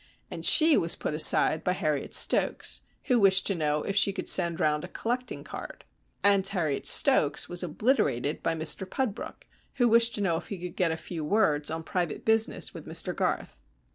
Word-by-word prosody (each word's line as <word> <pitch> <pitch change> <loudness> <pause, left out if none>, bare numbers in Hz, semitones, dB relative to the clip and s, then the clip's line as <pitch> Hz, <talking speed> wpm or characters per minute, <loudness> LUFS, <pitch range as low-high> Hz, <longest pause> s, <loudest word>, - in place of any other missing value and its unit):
And - - -8
she 315 -1 +5
was 165 - 0
put - - -5
aside 155 0 +4
by 180 - 0
Harriet 150 -6 -3
Stokes, - - +1 0.2
who 250 -3 +1
wished 190 -2 +4
to 200 - +1
know 150 -3 -2
if 195 - -4
she 200 0 +3
could 195 - -7
send 170 0 +3
round 150 -2 0
a - - -6
collecting 245 +6 -5
card. - - -10 0.4
And 200 -1 +3
Harriet 160 -8 -2
Stokes 155 - +3
was 175 0 -1
obliterated 160 - -1
by 165 - -2
Mr 160 +4 0
Pudbrook, 255 -5 -5 0.3
who 245 -3 +2
wished 230 0 +3
to 205 - -4
know 170 -5 0
if 170 - -9
he 200 - -7
could 175 -1 -8
get 180 -3 0
a 160 - -4
few 160 -1 -7
words 150 -5 0
on 160 +1 -5
private 175 -1 -4
business 225 0 +1
with - - -11
Mr - - 0
Garth. - - -3
180 Hz, 195 wpm, -26 LUFS, 155-210 Hz, 0.4 s, she